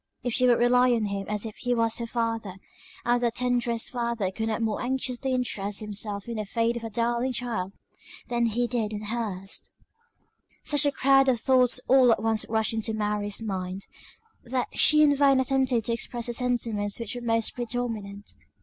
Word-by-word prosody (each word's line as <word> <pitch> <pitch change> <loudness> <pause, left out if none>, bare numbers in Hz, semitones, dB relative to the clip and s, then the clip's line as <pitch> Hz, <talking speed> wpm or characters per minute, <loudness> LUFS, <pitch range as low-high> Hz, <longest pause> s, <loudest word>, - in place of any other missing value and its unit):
If 245 -1 -2
she 255 +1 +4
would 240 -1 +5
rely 250 +1 +4
on 225 -2 0
him 200 -1 -4
as 210 +1 -3
if 220 - -7
he 245 -1 -1
was 230 -1 +1
her 235 - -4
father; 225 -4 -2 0.5
and 240 0 +2
that 235 -1 0
the - - -2
tenderest 245 -2 0
father 235 -6 -2
could 220 +3 -3
not 225 +1 -1
more 220 -2 -1
anxiously 260 0 -2
interest 210 -5 -1
himself 205 -1 -4
in 235 -1 -4
the 215 - -2
fate 230 +3 0
of 235 - -5
a 225 - -4
darling 235 +3 -1
child, 225 -7 -2 0.6
than 235 -1 +1
he 235 +2 0
did 230 -3 -2
in 210 0 -5
her's." 205 -3 -4 0.9
Such 290 0 +3
a - - +2
crowd 270 0 +4
of 245 -3 +2
thoughts 255 -1 +4
all 260 -2 +6
at 220 - +1
once 225 -1 0
rushed 220 0 +1
into 220 0 -2
Mary's 210 0 -1
mind, 190 -2 -4 0.6
that 250 +1 -2
she 305 0 +5
in 290 -1 +4
vain 275 -1 +4
attempted 260 -3 +1
to 235 - 0
express 235 0 -3
the 240 - -1
sentiments 230 -4 -1
which 230 -1 -4
were 245 - -6
most 230 -1 0
predominant. 225 -4 -4
235 Hz, 195 wpm, -26 LUFS, 215-245 Hz, 0.9 s, all